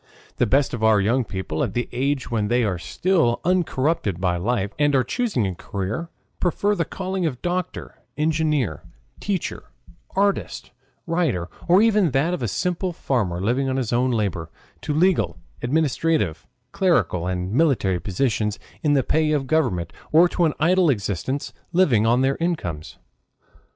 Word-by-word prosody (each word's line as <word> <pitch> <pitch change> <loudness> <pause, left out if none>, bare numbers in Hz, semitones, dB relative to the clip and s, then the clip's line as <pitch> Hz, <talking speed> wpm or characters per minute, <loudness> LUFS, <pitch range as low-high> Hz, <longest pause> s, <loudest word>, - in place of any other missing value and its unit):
The 120 - +2
best 135 +5 +2
of 115 -2 -3
our 110 -2 +5
young 120 +6 +2
people, 95 -7 -3
at - - -3
the 120 - -1
age 135 0 -1
when 110 -3 0
they 120 +2 +2
are 95 -5 -1
still 160 - +1
uncorrupted 160 - 0
by 90 -1 +1
life 100 +2 -1
and 145 -1 +3
are 130 - +4
choosing 220 - -1
a 95 - -2
career, 100 - -4 0.3
prefer 200 +3 +1
the 170 -5 -1
calling 190 0 -2
of 130 -5 -5
doctor, 180 0 -3 0.2
engineer, 150 - 0 0.4
teacher, 195 -4 -3 0.5
artist, 200 +1 0 0.3
writer, 160 - 0 0.2
or 185 +4 +6
even 210 -6 +3
that 160 +6 +1
of 125 -11 -2
simple 180 - -1
farmer 105 - -1
living 125 +7 0
on 130 - -1
his 125 -3 -1
own 125 +2 +2
labor, 100 -9 -1 0.3
to - - -3
legal, 155 - +2 0.2
administrative, 145 - 0 0.2
clerical, 110 - +1
and 90 +1 -2
military 120 - +2
positions 105 +3 -1 0.2
in 150 -2 +2
the 135 -2 +3
pay 155 +3 +1
of 145 -3 0
government, 125 - 0 0.2
or 165 +3 +6
to 175 0 +1
an 155 - +1
idle 175 +2 +4
existence 115 +3 -2 0.2
living 130 - +4
on 120 +2 +3
their 135 +1 +1
incomes. 90 - -3
130 Hz, 155 wpm, -23 LUFS, 105-165 Hz, 0.5 s, or